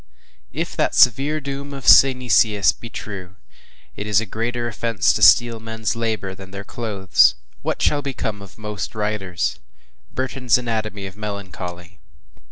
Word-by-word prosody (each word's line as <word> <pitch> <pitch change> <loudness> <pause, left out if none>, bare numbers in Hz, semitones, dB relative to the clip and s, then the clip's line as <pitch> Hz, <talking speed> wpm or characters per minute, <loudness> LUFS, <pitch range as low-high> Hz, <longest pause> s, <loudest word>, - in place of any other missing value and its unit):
If - - -4
that - - +1
severe 140 +6 +4
doom 140 0 -6
of 135 - -9
Synesius 120 -6 +5
be 115 - -11
true, 95 -5 -8 0.6
“It 105 - -6
is 105 -1 +3
a 115 - -2
greater 120 +3 -3
offence 115 - +1
to - - -3
steal 120 -1 +6
dead 115 - -15
men’s 110 -1 -2
labor, 110 -4 -2
than 95 0 -12
their 100 +1 -7
clothes,” 100 -4 +2 0.3
what - - -2
shall 145 - +2
become 115 -7 -4
of 95 -3 -13
most 105 -3 -6
writers? 105 -4 -2 0.5
BURTON’S 130 -2 0
ANATOMY 110 -4 -3
OF 95 -1 -8
MELANCHOLY. 95 -3 -7
110 Hz, 150 wpm, -21 LUFS, 100-120 Hz, 0.6 s, steal